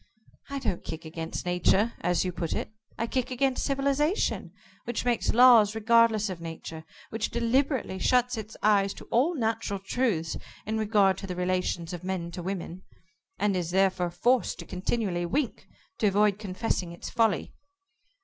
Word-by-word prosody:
"I 280 Hz, -, -3 dB
don't 245 Hz, -10 st, -2 dB
kick 160 Hz, 0 st, -7 dB
against 160 Hz, +1 st, -5 dB
Nature 180 Hz, +5 st, +2 dB
as 175 Hz, +1 st, +1 dB
you 180 Hz, -, -1 dB
put 170 Hz, -2 st, -3 dB
it -, -, -4 dB, 0.2 s
I 230 Hz, -, -1 dB
kick 255 Hz, +1 st, -1 dB
against 260 Hz, 0 st, 0 dB
civilization, 280 Hz, +6 st, 0 dB, 0.3 s
which 240 Hz, 0 st, -3 dB
makes 240 Hz, -2 st, +1 dB
laws 230 Hz, -3 st, +7 dB
regardless 225 Hz, -1 st, +4 dB
of 185 Hz, -3 st, -6 dB
Nature, 160 Hz, -1 st, -7 dB, 0.3 s
which 220 Hz, -1 st, -2 dB
deliberately 235 Hz, -3 st, 0 dB
shuts 250 Hz, +2 st, +2 dB
its 220 Hz, -1 st, -7 dB
eyes 200 Hz, -2 st, +3 dB
to -, -, -11 dB
all 285 Hz, +9 st, +3 dB
natural 225 Hz, -5 st, -1 dB
truths 195 Hz, -5 st, -1 dB, 0.3 s
in 220 Hz, +1 st, -1 dB
regard 205 Hz, -3 st, +3 dB
to 195 Hz, -, -7 dB
the 180 Hz, -, -4 dB
relations 180 Hz, -1 st, -1 dB
of 175 Hz, 0 st, -6 dB
men 180 Hz, -2 st, -3 dB
to 175 Hz, -, -6 dB
women, 185 Hz, -1 st, -5 dB, 0.6 s
and 200 Hz, 0 st, +1 dB
is 175 Hz, -2 st, -1 dB
therefore 185 Hz, -1 st, +2 dB
forced 240 Hz, +8 st, +1 dB
to -, -, -8 dB
continually 185 Hz, -2 st, -2 dB
wink 270 Hz, -, -2 dB, 0.3 s
to 215 Hz, -, +3 dB
avoid 205 Hz, 0 st, +3 dB
confessing 190 Hz, -3 st, -2 dB
its 170 Hz, -, -8 dB
folly." 225 Hz, -3 st, +1 dB
205 Hz, 160 wpm, -28 LUFS, 180-235 Hz, 0.6 s, laws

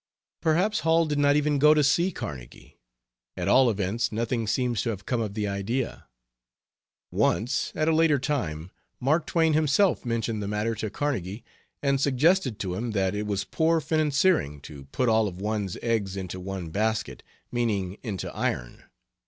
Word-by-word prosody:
Perhaps 180 Hz, +7 st, +2 dB
Hall 165 Hz, +1 st, +3 dB
did 150 Hz, -2 st, -1 dB
not 145 Hz, 0 st, +4 dB
even 150 Hz, -1 st, +2 dB
go 150 Hz, +2 st, +6 dB
to 150 Hz, -, +3 dB
see 170 Hz, +7 st, +3 dB
Carnegie; 65 Hz, -, -9 dB, 0.6 s
at -, -, -2 dB
all 130 Hz, -2 st, +5 dB
events 105 Hz, +2 st, -1 dB
nothing 115 Hz, +1 st, -1 dB
seems 120 Hz, 0 st, 0 dB
to 115 Hz, -, -2 dB
have 100 Hz, -3 st, -5 dB
come 125 Hz, -3 st, 0 dB
of 105 Hz, -2 st, -4 dB
the 105 Hz, -2 st, -1 dB
idea. 100 Hz, +6 st, -3 dB, 1.0 s
Once, 110 Hz, +8 st, +1 dB
at 155 Hz, -, 0 dB
a 160 Hz, -, +4 dB
later 160 Hz, -2 st, +4 dB
time, 95 Hz, -, -3 dB, 0.3 s
Mask 155 Hz, +5 st, +1 dB
Twain 160 Hz, -2 st, +2 dB
himself 155 Hz, +5 st, +2 dB
mentioned 115 Hz, -3 st, -2 dB
the 100 Hz, -, -3 dB
matter 105 Hz, +2 st, -1 dB
to 110 Hz, 0 st, -4 dB
Carnegie, 110 Hz, -5 st, -3 dB, 0.4 s
and 140 Hz, -1 st, +2 dB
suggested 140 Hz, -, +2 dB
to 95 Hz, -4 st, -3 dB
him 115 Hz, +4 st, -3 dB
that 95 Hz, -2 st, +1 dB
it 105 Hz, 0 st, -3 dB
was 100 Hz, -1 st, -1 dB
poor 165 Hz, +8 st, +1 dB
financiering 155 Hz, -, +1 dB
to 70 Hz, -3 st, -10 dB
put 125 Hz, -, -1 dB
all 110 Hz, -1 st, +3 dB
of 90 Hz, -2 st, -7 dB
one's 105 Hz, -2 st, -2 dB
eggs 105 Hz, -5 st, -1 dB
into 95 Hz, -1 st, -5 dB
one 95 Hz, -2 st, -5 dB
basket, 105 Hz, -, -1 dB, 0.3 s
meaning 105 Hz, -6 st, -1 dB
into 105 Hz, -6 st, -5 dB
iron. -, -, -3 dB
115 Hz, 170 wpm, -26 LUFS, 100-145 Hz, 1.0 s, go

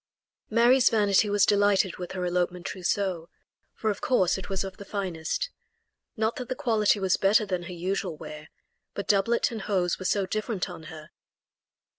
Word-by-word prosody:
Mary's 240 Hz, +3 st, +5 dB
vanity 210 Hz, -1 st, +3 dB
was 205 Hz, -1 st, +4 dB
delighted 205 Hz, -2 st, +3 dB
with 180 Hz, -1 st, -6 dB
her 180 Hz, -1 st, -2 dB
elopement 180 Hz, 0 st, -1 dB
trousseau, 185 Hz, -2 st, -2 dB, 0.5 s
for 220 Hz, -, 0 dB
of 205 Hz, -, -6 dB
course 190 Hz, -9 st, +2 dB
it 190 Hz, 0 st, -7 dB
was 195 Hz, 0 st, -1 dB
of 190 Hz, -1 st, -7 dB
the -, -, -8 dB
finest. 195 Hz, -, -3 dB, 0.7 s
Not 220 Hz, +1 st, 0 dB
that 250 Hz, -1 st, -6 dB
the 255 Hz, -, -2 dB
quality 220 Hz, -7 st, +2 dB
was 190 Hz, -1 st, +2 dB
better 205 Hz, +2 st, +3 dB
than 185 Hz, -3 st, -2 dB
her -, -, -6 dB
usual 180 Hz, -1 st, -3 dB
wear, 150 Hz, +1 st, -9 dB, 0.5 s
but 200 Hz, -, -4 dB
doublet 210 Hz, +5 st, +2 dB
and 225 Hz, -2 st, -5 dB
hose 185 Hz, -4 st, 0 dB
were 185 Hz, -, -7 dB
so 200 Hz, +1 st, +1 dB
different 215 Hz, -1 st, -2 dB
on 165 Hz, -2 st, -10 dB
her. 155 Hz, -2 st, -11 dB
195 Hz, 175 wpm, -27 LUFS, 180-215 Hz, 0.7 s, Mary's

